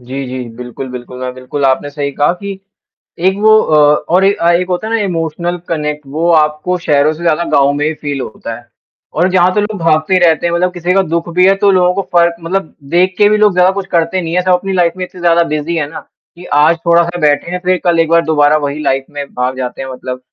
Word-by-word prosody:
जी, 130 +3 -6
जी। 125 -1 -6
बिल्कुल, 125 +2 -7
बिल्कुल, 125 0 -8
अ, - - -3
बिल्कुल 130 +3 -4
आपने 135 +2 +1
सही 145 -1 -3
कहा 145 +5 +1
कि 195 +1 -7 0.7
एक 190 +1 +2
वो 215 +1 +5
अ, 155 - 0 0.3
और 185 +3 +3
एक 200 +1 +2
अ, 170 - +3
एक 180 +1 0
होता 180 +3 -2
है - - -4
ना - - +2
इमोशनल 170 0 -3
कनेक्ट 150 -2 -3
वो 170 +2 +1
आपको 155 +3 +1
शहरों 150 -2 +2
से 160 - -10
ज़्यादा 170 0 +1
गाँव 140 0 +3
में 145 +1 -1
ही 160 - -1
फ़ील 145 -2 -5
होता 115 0 -7
है 120 - -19 0.5
और 175 +4 +2
जहाँ 185 0 +3
तो 210 - +2
लोग 210 0 -3
भागते 160 +2 +1
ही 185 - +3
रहते 170 -1 +3
हैं 170 - -1
मतलब 180 +1 0
किसी 175 0 -1
का 195 - +4
दुःख 170 0 -1
भी 180 0 +5
है 195 - +5
तो 200 - +6
लोगों 180 -1 +3
को 195 - -1
फ़र्क 170 0 +3
मतलब 170 +1 -3 0.2
देख 185 +2 +3
के 205 - +5
भी 215 - +3
लोग 210 -1 +4
ज़्यादा 180 +1 +4
कुछ 195 -1 -4
करते 170 +2 +1
नहीं 165 0 -4
हैं 180 - +2
सब 185 0 +1
अपनी 190 +2 0
लाइफ़ 175 -2 +2
में 185 - -2
इतने 180 - -14
ज़्यादा 170 0 +3
बिज़ी 155 +3 -2
है 150 -3 -1
ना, 160 - -7 0.4
कि 175 - -12
आज 150 +3 +4
थोड़ा-सा 170 +1 +2
बैठे 150 +2 +1
हैं 180 - -2
,फिर 185 0 +2
कल 170 -2 +2
एक 165 - +1
बार 170 0 +4
दोबारा 150 -1 +3
वही 140 +2 -4
लाइफ़ 135 -2 0
में 145 -1 -4
भाग 125 +1 -2
जाते 125 0 -4
हैं 135 - -6
मतलब, 130 0 -6
170 Hz, 255 wpm, -14 LUFS, 145-180 Hz, 0.7 s, तो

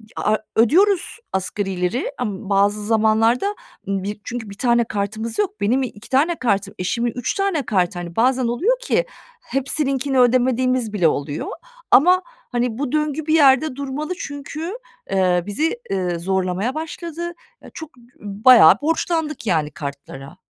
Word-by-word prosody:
a - - 0
a - - +3 0.2
ödüyoruz 370 - +3
asgarileri 190 +3 -2
ama 205 -4 -4
bazı 205 +1 +2
zamanlarda 225 - +2 0.3
bi 200 +1 -3
çünkü 235 -3 -6
bir 200 - -10
tane 235 0 +3
kartımız 215 +1 -4
yok. 410 0 -1
Benim 250 +6 +2
i - - -1
iki 210 -1 -14
tane 300 +6 +2
kartım, 200 - -1
eşimin 235 +6 -1
3 245 -2 -2
tane 390 - -1
kartı, 180 -4 0
hani, 170 -1 -7
bazen 255 +2 +2
oluyor 390 - +1
ki - - 0 0.4
hepsininkini 275 - 0
ödemediğimiz 255 -1 +2
bile 180 -6 +3
oluyor 145 0 -2 0.4
ama, 365 +5 +6 0.3
hani, 240 -2 -1
bu 275 -1 -3
döngü 305 0 -1
bir 310 - +1
yerde 280 -2 +4
durmalı 280 +4 -4
çünkü, 295 +5 -6 0.4
eee, 180 -2 +2
bizi, 315 - -1
eee, 180 -3 -1
zorlamaya 190 +5 -1
başladı. 335 +2 -5 0.4
Çok, 320 -4 -10
b 240 - -19 0.2
bayağı 210 -1 +6
borçlandık 320 -3 -1
yani 155 -5 +1
kartlara. 140 +2 -8
240 Hz, 145 wpm, -21 LUFS, 200-295 Hz, 0.4 s, ama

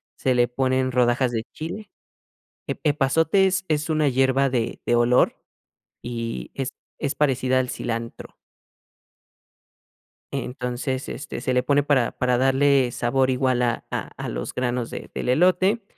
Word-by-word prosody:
se 130 - +1
le 120 -1 +3
ponen 130 +1 0
rodajas 125 0 +2
de 115 -2 -2
chile 170 +7 -6 0.8
ep - - -3
epazote 160 +6 +3
es 185 -1 0
es 150 0 0
una 155 -2 +2
hierba 135 +1 +2
de 120 -3 -2
de 120 - +2
olor, 120 +1 +3 0.7
y 115 -1 -5
es 135 -1 -3 0.3
es 140 0 0
parecida 130 -3 +1
al 125 -1 -1
cilantro. 115 -1 -5 2.0
Entonces, 130 0 -3
este, 145 +1 -6
se 130 - -1
le 125 - +3
pone 145 0 +3
para 135 -4 +2
para 125 -1 0
darle 135 0 +3
sabor 130 +3 +1
igual 130 -1 +1
a 120 -1 -1
a - - -4
a - - -5
los - - -4
granos 125 -1 -2
de - - -7
del - - -2
elote, 185 - +3
130 Hz, 145 wpm, -23 LUFS, 125-145 Hz, 2.0 s, le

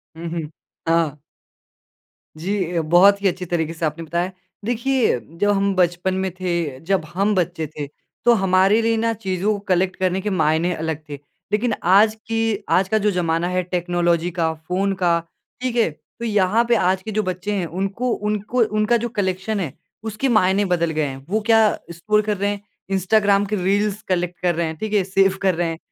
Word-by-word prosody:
हुँ, 165 +1 -6
हुँ। 160 -3 -4 0.4
हाँ। 165 -3 +2 1.2
जी, 180 +6 -2 0.2
ये 170 - +1
बहुत 200 +3 +6
ही 200 - +3
अच्छी 180 0 -2
तरीके 165 -2 -1
से 165 0 -2
आपने 155 +2 -3
बताया। 170 +3 -2 0.3
देखिए, 245 - +1
जब 165 - -2
हम 200 0 +1
बचपन 180 +1 +1
में 190 - -2
थे 170 -7 -2
जब 185 +2 -1
हम 200 +4 +1
बच्चे 175 -3 -1
थे, 150 0 -6 0.4
तो 240 - +7
हमारे 195 +1 +3
लिए 225 0 +1
ना 230 +1 +1
चीज़ों 200 -1 -1
को 205 - -4
कलेक्ट 185 0 +2
करने 185 0 0
के 210 - -2
मायने 165 -1 +1
अलग 160 -1 -4
थे। 145 -1 -6 0.3
लेकिन 220 +2 +1 0.2
आज 215 +2 +6
की 225 -1 0
आज 190 0 +3
का 220 - +3
जो 210 0 +2
ज़माना 170 -2 0
है 180 0 0
टेक्नोलॉजी 175 -1 0
का, 165 -2 0
फ़ोन 180 +5 -1
का, 175 -3 +2 0.4
ठीक 250 -2 -2
है? 230 -6 +3 0.3
तो 235 - -3
यहाँ 210 +1 +2
पे 240 - +5
आज 185 -2 +2
के 220 - -5
जो 215 +1 0
बच्चे 185 +2 -3
हैं, 185 -3 -1
उनको 195 +8 -2 0.2
उनको 210 +4 -1 0.2
उनका 215 +3 +3
जो 235 +1 -3
कलेक्शन 200 -1 -2
है, 160 -8 -3 0.3
उसके 220 +4 -2
मायने 200 -3 +3
बदल 170 -3 +1
गए 155 -1 0
हैं। 135 -1 -7
वो 215 +3 +1
क्या 225 -1 +5 0.3
स्क्रॉल 210 +6 +1
कर 210 -1 -2
रहे 200 +2 0
हैं, 205 -1 -4 0.3
इंस्टाग्राम 200 +1 +3
के 210 +1 -2
रील्स 205 +2 +1
कलेक्ट 180 -1 -1
कर 175 -2 +1
रहे 170 +1 0
हैं 160 - -5
ठीक 215 +5 -4
है? 205 -2 +3
सेव 195 0 +2
कर 190 -3 +2
रहे 175 0 0
हैं, 165 - -4
190 Hz, 200 wpm, -21 LUFS, 170-210 Hz, 1.2 s, तो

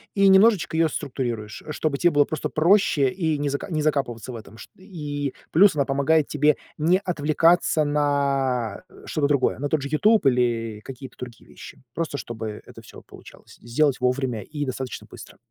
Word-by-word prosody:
и 200 -1 +4
немножечко 195 -3 +4
ее 165 -1 +3
структурируешь, 120 -7 -5
чтобы 150 -1 -2
те 175 - +3
было 145 -3 +4
просто 155 - -4
проще 160 -5 +3
и 160 0 -1
не 145 0 -1
за 140 0 -2 0.2
закапываться 130 -6 -2
в - - -8
этом. 110 -1 -11
Шт - - -13
и 150 -7 -5 0.2
плюс 190 +2 +5
она 140 -2 +1
помогает 140 +2 +2
тебе 150 0 +2 0.2
не 170 +5 +2
отвлекаться 165 0 +2
на 140 - 0 0.2
что-то 150 -3 0
другое, 140 -3 +1
на 145 +1 -2
тот 155 -1 0
же 140 - -5
"Ютуб" 210 +5 +3
или 120 -4 +1
какие-то 130 -1 -10
другие 120 -3 -10
вещи. - - -13
Просто 165 -3 -3
чтобы 110 -4 -6
это - - -13
всё - - -14
получалось - - -16
сделать 135 +4 +1
вовремя 125 -2 -1
и 145 +7 -5
достаточно 130 -1 -5
быстро. - - -13
145 Hz, 170 wpm, -23 LUFS, 125-155 Hz, 0.2 s, плюс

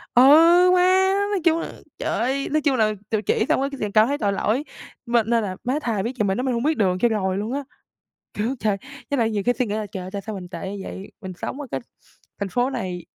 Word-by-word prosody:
ừ, 250 - +8 0.5
má, 375 +1 +4 0.2
nói 390 -4 0
chung 330 -1 +3
là, - - -5 0.3
trời - - -2
ơi, 270 +3 -1
nói 310 0 +2
chung 280 -3 +2
là 215 -2 +2 0.2
tự 215 -2 0
chỉ 220 - +1
xong - - +2
cái 275 - -8
liền 210 -1 -2
cảm 215 +2 +5
thấy 285 +1 -1
tội 205 -5 0
lỗi, 225 +7 0 0.4
m 235 - -7
nên 230 0 +1
là, 185 -2 -3
má, 265 +5 0
thà 220 -6 -1
biết 235 +5 -3
vậy 210 - +2
mình 195 +1 0
nói 250 - -1
mình 260 -2 0
hông 235 - -1
biết 310 +2 +1
đường 185 -4 +2
cho 240 - +3
rồi 190 -3 -1
luôn 215 +5 -3
á. 285 - -2 0.7
Kiểu, 225 +6 -1
trời, 210 -2 +1 0.3
với 280 - 0
lại 225 -1 +2
nhiều 205 -2 -1
khi 245 - +4
suy 250 - +1
nghĩ 210 - -3
là 215 -1 -2
trời 185 - -5
ơi 185 - -7
tại 200 - -4
sao 215 +1 -6
mình 180 -2 -7
tệ 190 +1 -6
như 200 -1 -6
vậy, 190 - -8
mình 190 -2 -7
sống 275 - -5
ở 290 - -5
cái - - -2 0.6
thành 200 - -1
phố 245 +6 0
này 185 -9 -4
225 Hz, 275 wpm, -23 LUFS, 200-265 Hz, 0.7 s, ừ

